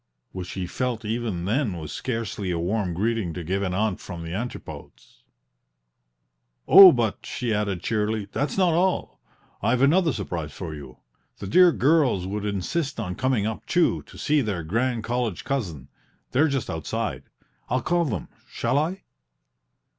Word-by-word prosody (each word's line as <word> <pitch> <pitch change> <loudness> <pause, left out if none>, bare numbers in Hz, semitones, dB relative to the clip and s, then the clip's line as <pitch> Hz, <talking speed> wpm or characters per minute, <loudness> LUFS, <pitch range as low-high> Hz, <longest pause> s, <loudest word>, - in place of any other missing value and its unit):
which 90 -1 -6
he 95 -2 -3
felt 120 +3 -3
even 110 -6 -2
then 110 -2 0
was 80 -2 -7
scarcely 115 -5 -3
a 85 - 0
warm 95 +2 -1
greeting 105 -3 -1
to 90 - -5
give 95 +4 -1
an 95 -2 -1
aunt 105 -1 0
from 85 -2 -7
the 80 0 -6
Antipodes. 120 +6 -8 1.5
"Oh, 195 -2 +11
but," 115 -6 -1
she 120 -3 -2
added, 100 -4 -1
cheerily, 110 -1 -1
"that's 145 +6 -2
not 180 -3 +3
all; 180 +3 0 0.4
I've 125 +2 +2
another 165 +4 +4
surprise 90 - -4
for 85 -4 -6
you: 70 -4 -10 0.4
the - - -7
dear 180 - +6
girls 140 - +2
would 105 +2 -3
insist 115 - -2
on 90 -5 -3
coming 130 -1 0
up, 110 0 -4
too, 175 -1 +2
to - - -13
see 150 -1 +2
their 100 -8 -2
grand 115 +7 -1
college 120 -6 -2
cousin; 90 - -3 0.4
they're 145 +5 +4
just 135 -5 -1
outside. 80 -1 -3 0.5
I'll 125 +1 0
call 175 0 +2
them 110 - -2
in - - -33
shall 140 - 0
I?" 175 +6 -2
110 Hz, 160 wpm, -25 LUFS, 90-130 Hz, 1.5 s, Oh